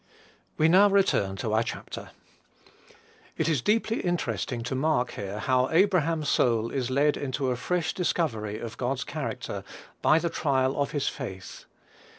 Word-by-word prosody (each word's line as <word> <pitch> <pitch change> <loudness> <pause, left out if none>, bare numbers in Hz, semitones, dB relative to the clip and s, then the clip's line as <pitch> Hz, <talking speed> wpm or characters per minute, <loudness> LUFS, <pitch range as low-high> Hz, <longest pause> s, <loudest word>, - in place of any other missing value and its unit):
We 155 - +4
now 190 +5 +6
return 190 - +2
to 110 +2 -3
our 110 - +3
chapter. 115 - -6 1.3
It 160 - 0
is 155 -7 +1
deeply 225 - +1
interesting 120 - -2
to 125 - -3
mark 130 -2 +1
here 100 +1 -5
how 130 +3 +1
Abraham's 165 -3 +2
soul 115 -2 +2
is 130 -3 -2
led 145 +3 +2
into 135 -1 -2
a - - 0
fresh 160 +6 -1
discovery 115 - -1
of 115 0 -7
God's 130 +2 -1
character 145 0 -5 0.4
by 155 - +5
the 170 0 -1
trial 135 -2 +1
of 140 - 0
his 145 -2 -2
faith. 95 -1 -6
135 Hz, 155 wpm, -27 LUFS, 120-160 Hz, 1.3 s, now